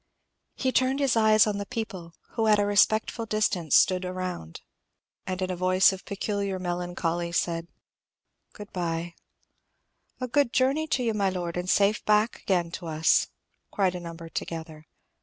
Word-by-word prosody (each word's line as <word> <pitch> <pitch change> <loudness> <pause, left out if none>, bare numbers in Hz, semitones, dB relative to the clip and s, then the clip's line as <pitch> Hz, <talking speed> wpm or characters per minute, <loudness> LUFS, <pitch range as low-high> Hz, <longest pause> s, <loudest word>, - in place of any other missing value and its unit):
He 260 - 0
turned 260 +2 +2
his 275 -4 +2
eyes 215 -1 +5
on 205 -2 -2
the 200 - -4
people, 195 -9 -6
who 225 -1 -1
at 210 -1 +5
a 205 - +2
respectful 215 +3 +2
distance 205 -8 +1
stood 185 -1 +4
around, 180 - -5 0.7
and 185 -1 -3
in 185 - -2
a - - -2
voice 185 +2 +4
of 190 - -9
peculiar 200 -1 -2
melancholy 175 -1 -2
said, 170 -1 -1 0.9
"Good 205 -1 -11
bye." 170 -1 -3 1.1
"A 255 - -3
good 265 -1 +1
journey 275 +5 +2
to 255 -4 0
you, 230 -2 0
my 200 -2 +1
Lord, 175 -2 -4
and 180 +1 -3
safe 200 +2 +3
back 210 +2 +2
again 175 -3 0
to 175 0 -7
us," 160 0 +3 0.4
cried 190 -3 +1
a 180 - -5
number 170 -1 -8
together. 160 -1 -6
185 Hz, 160 wpm, -27 LUFS, 175-215 Hz, 1.1 s, eyes